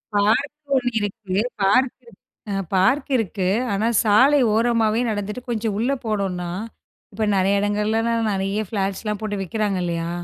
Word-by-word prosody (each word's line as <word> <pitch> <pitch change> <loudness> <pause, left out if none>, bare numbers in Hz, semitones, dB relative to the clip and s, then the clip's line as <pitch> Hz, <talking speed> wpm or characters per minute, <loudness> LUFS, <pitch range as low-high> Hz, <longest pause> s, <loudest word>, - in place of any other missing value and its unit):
Park 220 +9 +2 0.2
ஒண்ணு 245 -2 +2
இருக்கு. 205 -2 -4 0.3
Park 250 +6 +3
இருக் 235 -5 -18 0.3
அ - - -1 0.2
பார்க் 260 +11 +2
இருக்கு. 195 -3 -2 0.3
ஆனா, 215 +3 0 0.2
சாலை 260 +7 +5
ஓரமாவே 225 -1 +2
நடந்துட்டு, 210 +3 -3
கொஞ்ச 225 -1 -2
உள்ள 245 +5 0
போனோம்னா, 190 -5 -2 0.6
இப்ப 215 +1 -1
நெறைய 195 +1 +2
எடங்கள்லலாம் 220 +2 0
நெறைய 195 +2 -1
ஃப்ளாட்ஸ்லாம் 200 +1 -2
போட்டு 205 -2 -3
விக்கிறாங்க 200 +1 -1
இல்லையா, 170 -1 -2
210 Hz, 135 wpm, -22 LUFS, 195-230 Hz, 0.6 s, சாலை